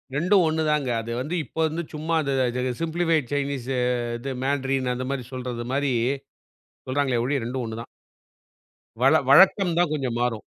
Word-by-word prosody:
2ம் 180 +4 +4
ஒண்ணுதாங்க. 150 -4 0
அது 115 +1 -6
வந்து 155 +6 -3
இப்ப - - -20
வந்து 165 +2 -3
சும்மா 160 +2 -2
அத 140 -1 -1 0.2
த 125 - -1 0.2
சிம்பிளிஃபைட் 165 -4 0
சைனீஸு 135 -2 -2 0.5
து 135 - -2
மேன்றீன் 135 -2 0
அந்த 130 +1 -4
மாரி 130 -3 -3
சொல்றது 125 -2 -4
மாரி 140 -2 +1 0.9
சொல்றாங்களே 130 -3 +1
ஒழிய, 140 +1 +1
2ம் 125 +1 -3
ஒண்ணுதான். 115 +1 -6 1.1
வழ - - +5 0.2
வழக்கம் 185 +4 +6
தான் 175 -3 +3
கொஞ்சம் 130 -5 -2
மாறும். 120 -3 -1
140 Hz, 150 wpm, -24 LUFS, 125-155 Hz, 1.1 s, வழக்கம்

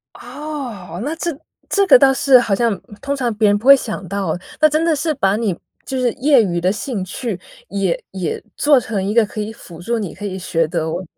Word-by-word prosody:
哦， 245 - -7
那 300 +3 -2
这 340 +1 -2 0.4
这 400 -1 +2
个 370 - +8
倒 270 +1 +5
是 265 -1 +5
好 225 -5 +1
像 230 -1 +1 0.2
通 280 - -2
常 250 -4 -1
别 210 0 +3
人 205 - +4
不 220 - -6
会 275 0 +10
想 215 -7 -5
到。 195 -4 -2 0.2
那 310 - +7
真 310 +2 +1
的 330 -1 +3
是 310 +2 -1
把 200 -7 +1
你 215 -6 -1 0.3
就 265 - -3
是 250 -1 +2
业 270 -2 +4
余 175 -4 -1
的 180 +2 +2
兴 210 -1 -4
趣， 205 +1 -4 0.3
也 195 -3 -1
也 185 -4 -4
做 290 -2 +4
成 215 -4 -3
一 200 +2 -2
个 230 -1 +5
可 215 +1 -6
以 210 +1 -4
辅 175 -6 -13
助 235 +6 -1
你 200 -6 -5
可 205 - -9
以 190 -2 -4
学 165 -3 0
德 165 +2 -3
215 Hz, 240 characters per minute, -19 LUFS, 190-270 Hz, 0.4 s, 会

